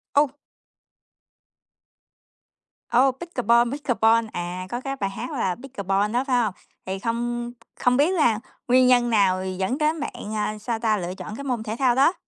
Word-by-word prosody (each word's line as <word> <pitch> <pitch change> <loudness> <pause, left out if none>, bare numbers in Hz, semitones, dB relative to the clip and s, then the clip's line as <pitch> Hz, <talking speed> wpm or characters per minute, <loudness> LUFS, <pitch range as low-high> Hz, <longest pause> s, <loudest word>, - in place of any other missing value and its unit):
Ô! 290 -1 +4 2.6
Ô, 255 +3 +4
pickeball, 245 -5 +1
pickeball, 230 -5 +2
à, 175 +1 -4
có 240 +4 -3
cái 275 +1 -3
bài 200 -7 -2
hát 195 - -6
là 195 - -1
"Pickeball" 205 -5 -1
đó, 245 +2 +2
phải 255 - +2
hông? 210 -4 -1 0.3
Thì 190 +1 -3
không 240 +2 -2 0.3
không 250 0 +3
biết 305 +7 +3
là 240 - +3 0.3
nguyên 255 +1 +5
nhân 245 -1 +4
nào 190 -4 +2
dẫn 190 +6 -2
đến 310 +1 +1
bạn, 290 - -4 0.3
ờ, 215 - -3
sao 225 +1 -3
ta, 220 -2 +2
lựa 180 -1 -4
chọn 210 +3 -7
cái 280 - -7
môn 250 -5 -2
thể 220 0 -4
thao 255 -3 +3
đó? 275 +7 +4
235 Hz, 170 wpm, -24 LUFS, 210-260 Hz, 2.6 s, nguyên